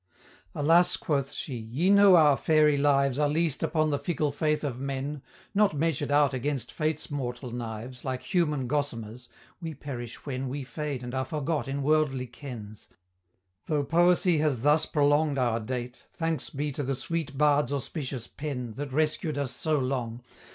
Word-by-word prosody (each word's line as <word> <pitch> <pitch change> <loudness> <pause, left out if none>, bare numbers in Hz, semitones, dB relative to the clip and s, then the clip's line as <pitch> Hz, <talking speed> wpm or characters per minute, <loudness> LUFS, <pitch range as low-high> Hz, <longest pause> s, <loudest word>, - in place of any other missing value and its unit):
"Alas," 170 +4 +4
quoth 140 -3 -1
she, 135 - -5
"ye 120 - 0
know 200 -2 +8
our 150 -4 +6
fairy 150 0 +4
lives 140 -1 +2
Are 150 -1 +3
leased 155 -1 0
upon 155 -2 +1
the 145 - 0
fickle 150 -1 -1
faith 150 +1 0
of 130 -4 -3
men; 140 +1 -3 0.3
Not 205 -5 +3
measured 160 -1 0
out 145 -1 +4
against 130 -1 -2
Fate's 155 -1 -2
mortal 125 -3 -4
knives, 120 +1 -6
Like 130 -1 -3
human 150 -7 0
gosamers, 125 -4 -3 0.3
we 165 -2 -5
perish 120 -4 -7
when 130 -2 -3
We 140 +2 -4
fade 140 -1 -4
and 125 0 -6
are 130 0 0
forgot 150 -1 -2
in 140 +1 -2
worldly 145 -3 +2
kens 120 -4 -9 0.8
Though 150 -2 +1
poesy 175 +2 +3
has 145 -6 +1
thus 150 +2 +4
prolong'd 145 0 +2
our 120 -3 +1
date, 125 +2 -5
Thanks 165 -4 -2
be 145 0 -3
to 140 - -4
the 135 0 -1
sweet 160 -1 -3
Bard's 145 -2 +3
auspicious 135 -3 -3
pen 125 -6 -5
That 145 -1 -4
rescued 155 +1 0
us 140 -3 -1
so 155 -2 0
long! 125 -3 -2
145 Hz, 165 wpm, -28 LUFS, 130-155 Hz, 0.8 s, know